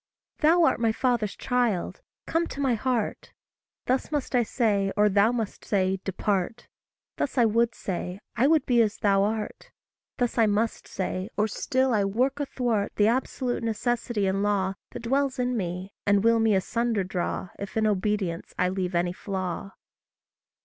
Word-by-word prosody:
"Thou 330 Hz, +3 st, +5 dB
art 320 Hz, -, +3 dB
my 230 Hz, -1 st, +2 dB
father's 235 Hz, -3 st, 0 dB
child 240 Hz, -7 st, -1 dB, 0.2 s
come 335 Hz, +1 st, 0 dB
to -, -, -8 dB
my 270 Hz, -3 st, +2 dB
heart:" 235 Hz, -1 st, -2 dB, 0.5 s
Thus 255 Hz, +3 st, 0 dB
must 290 Hz, -3 st, -2 dB
I 250 Hz, -, +4 dB
say, 210 Hz, -4 st, +1 dB
or 210 Hz, 0 st, +5 dB
Thou 205 Hz, +3 st, +4 dB
must 225 Hz, -4 st, -3 dB
say, 190 Hz, -1 st, +1 dB
"Depart;" 200 Hz, +3 st, -2 dB, 0.5 s
Thus 280 Hz, -, -2 dB
I 240 Hz, -, +6 dB
would 230 Hz, +1 st, +2 dB
say 180 Hz, 0 st, -4 dB, 0.2 s
I 245 Hz, +4 st, +3 dB
would 315 Hz, 0 st, +3 dB
be 240 Hz, -3 st, +4 dB
as 220 Hz, -1 st, +1 dB
thou 195 Hz, -1 st, +3 dB
art; 215 Hz, +1 st, -2 dB, 0.5 s
Thus 245 Hz, -1 st, 0 dB
I 225 Hz, -, +5 dB
must 215 Hz, +2 st, 0 dB
say, 185 Hz, +1 st, -3 dB
or 210 Hz, +1 st, +2 dB
still 260 Hz, +4 st, 0 dB
I 210 Hz, -2 st, +3 dB
work 250 Hz, +8 st, 0 dB
athwart 240 Hz, -7 st, -1 dB
The 210 Hz, +1 st, +4 dB
absolute 250 Hz, 0 st, -1 dB
necessity 230 Hz, -1 st, -1 dB
and 190 Hz, +1 st, 0 dB
law 200 Hz, -2 st, +1 dB, 0.2 s
That 240 Hz, -, -8 dB
dwells 275 Hz, +2 st, +1 dB
in 250 Hz, 0 st, 0 dB
me, 185 Hz, -1 st, -4 dB
and 200 Hz, 0 st, +4 dB
will 230 Hz, 0 st, +4 dB
me 220 Hz, -2 st, +3 dB
asunder 230 Hz, +2 st, 0 dB
draw, 185 Hz, 0 st, -3 dB
If 200 Hz, +2 st, -5 dB
in 220 Hz, -, +2 dB
obedience 200 Hz, -4 st, -1 dB
I 180 Hz, -, +2 dB
leave 185 Hz, -1 st, -2 dB
any 175 Hz, +1 st, +1 dB
flaw. 190 Hz, 0 st, -4 dB
220 Hz, 170 wpm, -26 LUFS, 195-245 Hz, 0.5 s, I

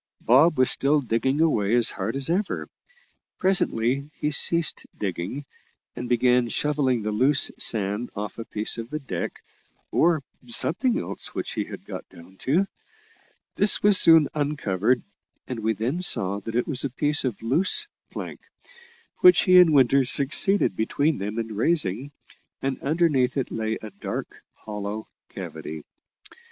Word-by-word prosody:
Bob 150 Hz, +7 st, +5 dB
was 130 Hz, -1 st, +3 dB
still 145 Hz, +2 st, +2 dB
digging 130 Hz, +3 st, -1 dB
away 115 Hz, -9 st, +2 dB
as 120 Hz, -2 st, +4 dB
hard 105 Hz, +5 st, -4 dB
as 135 Hz, -1 st, -1 dB
ever. 195 Hz, +4 st, -2 dB, 0.7 s
Presently 140 Hz, -7 st, 0 dB
he 150 Hz, -, -1 dB
ceased 170 Hz, +1 st, +2 dB
digging, 100 Hz, +8 st, -4 dB, 0.5 s
and 125 Hz, -, -6 dB
began 125 Hz, 0 st, +2 dB
shovelling 135 Hz, -4 st, 0 dB
the 105 Hz, -, -2 dB
loose 135 Hz, +7 st, +3 dB
sand 105 Hz, +2 st, 0 dB
off 105 Hz, +2 st, -6 dB
a 115 Hz, -, -5 dB
piece 110 Hz, +2 st, -1 dB
of 115 Hz, +1 st, -7 dB
the 155 Hz, -, -3 dB
deck 95 Hz, -, -6 dB, 0.5 s
or 165 Hz, -4 st, +2 dB, 0.2 s
something 200 Hz, -, +1 dB
else -, -, -6 dB
which -, -, -4 dB
he -, -, -3 dB
had -, -, -10 dB
got -, -, -8 dB
down 90 Hz, +3 st, -16 dB
to. 160 Hz, -, +1 dB, 0.9 s
This 205 Hz, 0 st, +4 dB
was 205 Hz, -2 st, +5 dB
soon 165 Hz, -3 st, +6 dB
uncovered, 125 Hz, -6 st, 0 dB, 0.4 s
and 125 Hz, -3 st, -5 dB
we 110 Hz, +1 st, 0 dB
then 120 Hz, -, -3 dB
saw 100 Hz, -, +1 dB
that 110 Hz, +3 st, -7 dB
it 120 Hz, -, 0 dB
was 135 Hz, -5 st, -3 dB
a 140 Hz, -, -1 dB
piece 145 Hz, +4 st, 0 dB
of 125 Hz, -6 st, -3 dB
loose 185 Hz, -, +2 dB, 0.2 s
plank, -, -, -7 dB, 0.8 s
which 360 Hz, 0 st, +7 dB
he 185 Hz, -2 st, +6 dB
and 175 Hz, -3 st, +6 dB
Winter 135 Hz, -1 st, +4 dB
succeeded 140 Hz, -, +3 dB
between 140 Hz, -, 0 dB
them 105 Hz, +3 st, -4 dB
in 115 Hz, -2 st, -4 dB
raising, 130 Hz, -, 0 dB, 0.5 s
and 135 Hz, 0 st, -3 dB
underneath 145 Hz, -4 st, +1 dB
it 135 Hz, -, -2 dB
lay 110 Hz, 0 st, -2 dB
a 110 Hz, -, -8 dB
dark 100 Hz, -, -7 dB, 0.2 s
hollow 105 Hz, 0 st, -5 dB, 0.2 s
cavity. 80 Hz, -1 st, -8 dB
130 Hz, 150 wpm, -24 LUFS, 110-150 Hz, 0.9 s, which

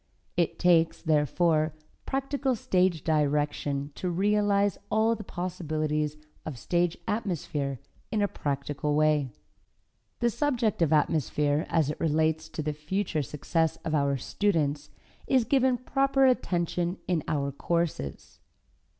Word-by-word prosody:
It 170 Hz, -2 st, 0 dB
takes, 165 Hz, -2 st, +3 dB
therefore, 155 Hz, 0 st, +2 dB, 0.3 s
practical 270 Hz, -1 st, 0 dB
stage 180 Hz, -6 st, +1 dB
direction 145 Hz, -2 st, 0 dB
to 180 Hz, -, -3 dB
realize 205 Hz, +2 st, +2 dB
all 220 Hz, +1 st, +3 dB
the 220 Hz, -, -6 dB
possibilities 155 Hz, -5 st, -2 dB, 0.3 s
of 150 Hz, -5 st, -6 dB
stage 175 Hz, +6 st, 0 dB
atmosphere 150 Hz, -, -2 dB, 0.3 s
in 215 Hz, -, -1 dB
a -, -, +3 dB
practical 145 Hz, -2 st, -2 dB
way. 150 Hz, -3 st, +3 dB, 0.9 s
The 235 Hz, 0 st, +2 dB
subject 235 Hz, -6 st, 0 dB
of 165 Hz, -3 st, +3 dB
atmosphere 150 Hz, -1 st, +1 dB
as 155 Hz, -3 st, +2 dB
it -, -, -7 dB
relates 160 Hz, 0 st, +1 dB
to 155 Hz, -, -4 dB
the 150 Hz, 0 st, -1 dB
future 155 Hz, +2 st, -2 dB
success 155 Hz, +4 st, -1 dB
of 160 Hz, -, -2 dB
our 140 Hz, -2 st, +2 dB
students, 150 Hz, -3 st, 0 dB, 0.4 s
is 260 Hz, -3 st, +4 dB
given 260 Hz, -1 st, +3 dB
proper 270 Hz, +2 st, +2 dB
attention 175 Hz, -7 st, +1 dB
in 170 Hz, -5 st, 0 dB
our 140 Hz, -2 st, -1 dB
courses. 165 Hz, -, -3 dB
160 Hz, 125 wpm, -28 LUFS, 150-200 Hz, 0.9 s, is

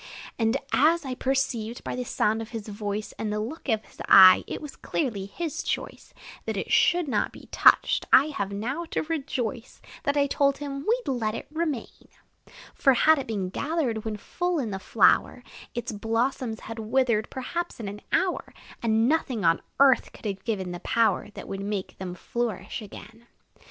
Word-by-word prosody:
And 225 Hz, +3 st, +2 dB, 0.2 s
as 320 Hz, +2 st, +4 dB
I 260 Hz, -, -3 dB
perceived, 250 Hz, -3 st, -1 dB
by -, -, -4 dB
the 250 Hz, -, -2 dB
sound 220 Hz, -2 st, 0 dB
of 225 Hz, -, -7 dB
his 225 Hz, -3 st, -6 dB
voice, 210 Hz, 0 st, -4 dB
And 215 Hz, -1 st, -2 dB
the 210 Hz, -, -1 dB
look 265 Hz, +7 st, -5 dB
of 220 Hz, -2 st, +1 dB
his -, -, -14 dB
eye, 185 Hz, -1 st, +9 dB
it -, -, -4 dB
was 300 Hz, -3 st, -9 dB
clearly 215 Hz, -11 st, -2 dB
his 325 Hz, +8 st, -4 dB
choice -, -, -4 dB, 0.4 s
That -, -, -2 dB
it -, -, -4 dB
should 345 Hz, -2 st, +4 dB
not 265 Hz, -, 0 dB
be -, -, -14 dB
touched, -, -, +4 dB
I 285 Hz, +3 st, +7 dB
have 200 Hz, -9 st, -3 dB
now 245 Hz, +11 st, -3 dB
to -, -, -2 dB
rejoice 265 Hz, -7 st, -4 dB, 0.2 s
That 285 Hz, +1 st, 0 dB
I 285 Hz, -, +4 dB
told 280 Hz, 0 st, +2 dB
him 280 Hz, -1 st, -6 dB
we 480 Hz, +3 st, +2 dB
'd -, -, -3 dB
let 225 Hz, -4 st, -1 dB
it -, -, -6 dB
remain; 310 Hz, -6 st, -4 dB, 0.7 s
For, 270 Hz, -3 st, +4 dB
had 315 Hz, +4 st, +5 dB
it 270 Hz, -, -5 dB
been 200 Hz, -5 st, -2 dB
gathered 275 Hz, -, -1 dB
when 220 Hz, -1 st, -3 dB
full 355 Hz, -, -2 dB
in 240 Hz, -8 st, -2 dB
the 195 Hz, -, -4 dB
flower, -, -, +3 dB, 0.3 s
Its 240 Hz, -1 st, -3 dB
blossoms 225 Hz, +2 st, -1 dB
had 225 Hz, 0 st, -7 dB
withered, 225 Hz, -1 st, +1 dB
perhaps, 340 Hz, +6 st, -4 dB
in 220 Hz, -, -5 dB
an 205 Hz, +1 st, -7 dB
hour, 375 Hz, -1 st, 0 dB, 0.3 s
And 225 Hz, 0 st, +2 dB
nothing 260 Hz, -, 0 dB
on 165 Hz, 0 st, +3 dB, 0.2 s
earth 275 Hz, -2 st, +4 dB
could -, -, -15 dB
have 195 Hz, -2 st, -3 dB
given 195 Hz, -6 st, -2 dB
the 175 Hz, -, -6 dB
power 225 Hz, +2 st, +1 dB
That -, -, -8 dB
would 195 Hz, 0 st, -5 dB
make 200 Hz, -1 st, -4 dB
them 180 Hz, -1 st, -5 dB
flourish 215 Hz, 0 st, -3 dB
again. 220 Hz, +2 st, -12 dB
235 Hz, 185 wpm, -26 LUFS, 210-280 Hz, 0.7 s, eye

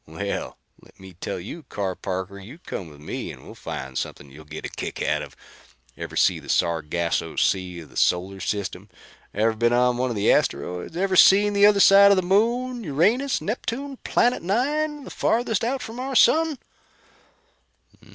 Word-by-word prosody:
Well, 100 Hz, +6 st, -5 dB, 0.2 s
let -, -, -21 dB
me 95 Hz, -1 st, -12 dB
tell 90 Hz, -, -5 dB
you, 110 Hz, -, -8 dB
Carr 100 Hz, -9 st, -4 dB
Parker, 95 Hz, +1 st, -5 dB
you 110 Hz, +10 st, -11 dB
come 95 Hz, -, -7 dB
with 75 Hz, -1 st, -15 dB
me 75 Hz, -, -5 dB
and -, -, -13 dB
we'll -, -, -10 dB
find 65 Hz, 0 st, -7 dB
something 70 Hz, +1 st, -5 dB
you'll 75 Hz, +3 st, -13 dB
get 80 Hz, +1 st, -8 dB
a -, -, -4 dB
kick -, -, -6 dB
out -, -, 0 dB
of. -, -, -9 dB, 0.6 s
Ever -, -, -7 dB
seen -, -, +2 dB
the -, -, -14 dB
Sargasso 85 Hz, -1 st, -1 dB
Sea 90 Hz, -2 st, 0 dB
of 75 Hz, -4 st, -14 dB
the -, -, -18 dB
solar 95 Hz, +2 st, +1 dB
system? 100 Hz, -1 st, -4 dB, 0.4 s
Ever 110 Hz, +2 st, +1 dB
been 120 Hz, +2 st, +1 dB
on 125 Hz, 0 st, +3 dB
one 130 Hz, +1 st, 0 dB
of 120 Hz, -, -3 dB
the 100 Hz, -, +3 dB
asteroids? 90 Hz, -, -1 dB
Ever 190 Hz, +1 st, 0 dB
seen 205 Hz, +3 st, +6 dB
the 200 Hz, 0 st, +6 dB
other 205 Hz, -1 st, +4 dB
side 200 Hz, +1 st, +8 dB
of 200 Hz, -, +4 dB
the 185 Hz, -, +1 dB
Moon 235 Hz, +6 st, +1 dB
Uranus 215 Hz, -, +1 dB
Neptune 260 Hz, +5 st, -4 dB
Planet 245 Hz, 0 st, +1 dB
9, 290 Hz, -, -1 dB
the -, -, -10 dB
farthest 225 Hz, -2 st, 0 dB
out 255 Hz, +3 st, -1 dB
from 225 Hz, +2 st, -8 dB
the 265 Hz, +1 st, -4 dB
sun?" 320 Hz, +2 st, +4 dB
130 Hz, 180 wpm, -24 LUFS, -, 0.6 s, side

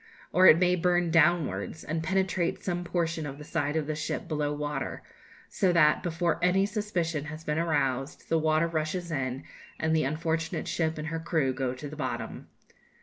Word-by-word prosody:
Or 185 Hz, +1 st, +7 dB
it 155 Hz, -, +9 dB
may 180 Hz, 0 st, +3 dB
burn 175 Hz, -1 st, +2 dB
downwards, 160 Hz, -, +2 dB
and 160 Hz, +1 st, -2 dB
penetrate 185 Hz, 0 st, 0 dB
some 175 Hz, -1 st, -2 dB
portion 165 Hz, -2 st, -1 dB
of 140 Hz, 0 st, -7 dB
the 150 Hz, -, -9 dB
side 145 Hz, 0 st, -2 dB
of 155 Hz, -2 st, 0 dB
the 155 Hz, -, -2 dB
ship 150 Hz, 0 st, -3 dB
below 150 Hz, -2 st, -1 dB
water; 145 Hz, -1 st, -3 dB, 0.4 s
so 185 Hz, -, +1 dB
that, 150 Hz, -3 st, +5 dB
before 170 Hz, -1 st, 0 dB
any 190 Hz, +2 st, +4 dB
suspicion 180 Hz, -8 st, -2 dB
has 155 Hz, +1 st, -7 dB
been 150 Hz, 0 st, -1 dB
aroused, 140 Hz, -5 st, -1 dB
the 165 Hz, -, +2 dB
water 155 Hz, +1 st, +2 dB
rushes 170 Hz, +2 st, -2 dB
in, 135 Hz, -2 st, -2 dB, 0.4 s
and 160 Hz, 0 st, +1 dB
the 155 Hz, -, +2 dB
unfortunate 160 Hz, +3 st, -2 dB
ship 160 Hz, -1 st, -1 dB
and 155 Hz, +1 st, -4 dB
her 165 Hz, 0 st, -3 dB
crew 160 Hz, -5 st, 0 dB
go 130 Hz, -1 st, -2 dB
to 145 Hz, +3 st, -7 dB
the 150 Hz, -, -8 dB
bottom. 155 Hz, -, -4 dB
160 Hz, 185 wpm, -28 LUFS, 150-175 Hz, 0.4 s, it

